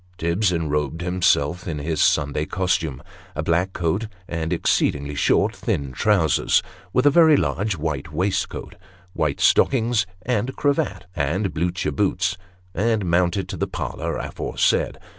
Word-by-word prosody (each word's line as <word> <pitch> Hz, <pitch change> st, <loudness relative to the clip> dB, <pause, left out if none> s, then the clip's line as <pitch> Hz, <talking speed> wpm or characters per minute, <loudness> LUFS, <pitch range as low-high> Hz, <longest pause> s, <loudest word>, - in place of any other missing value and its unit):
Tibbs 85 Hz, +4 st, +1 dB
enrobed 75 Hz, -2 st, -1 dB
himself 90 Hz, -2 st, +1 dB
in 80 Hz, -3 st, -3 dB
his 80 Hz, +2 st, -2 dB
Sunday 75 Hz, +1 st, +2 dB
costume 80 Hz, -7 st, -1 dB, 0.3 s
a 75 Hz, -, -2 dB
black 85 Hz, +4 st, +1 dB
coat, 90 Hz, +5 st, -1 dB, 0.2 s
and 80 Hz, -1 st, -3 dB
exceedingly 70 Hz, 0 st, +1 dB
short, 70 Hz, -, +2 dB
thin 70 Hz, -2 st, -2 dB
trousers; 80 Hz, +2 st, +2 dB, 0.3 s
with 125 Hz, +6 st, +2 dB
a 145 Hz, -, +7 dB
very 160 Hz, -1 st, +6 dB
large 95 Hz, +6 st, -1 dB
white 75 Hz, -2 st, -3 dB
waistcoat, 95 Hz, +5 st, -2 dB, 0.4 s
white 75 Hz, -3 st, -1 dB
stockings 115 Hz, -5 st, +3 dB, 0.2 s
and 125 Hz, +2 st, -1 dB
cravat, 145 Hz, -6 st, 0 dB
and 85 Hz, +6 st, -1 dB
Blucher 85 Hz, +2 st, -1 dB
boots 95 Hz, -2 st, 0 dB, 0.4 s
and 110 Hz, +1 st, +1 dB
mounted 90 Hz, +2 st, +1 dB
to -, -, -5 dB
the -, -, -1 dB
parlour -, -, -4 dB
aforesaid. -, -, 0 dB
85 Hz, 135 wpm, -22 LUFS, 75-100 Hz, 0.4 s, a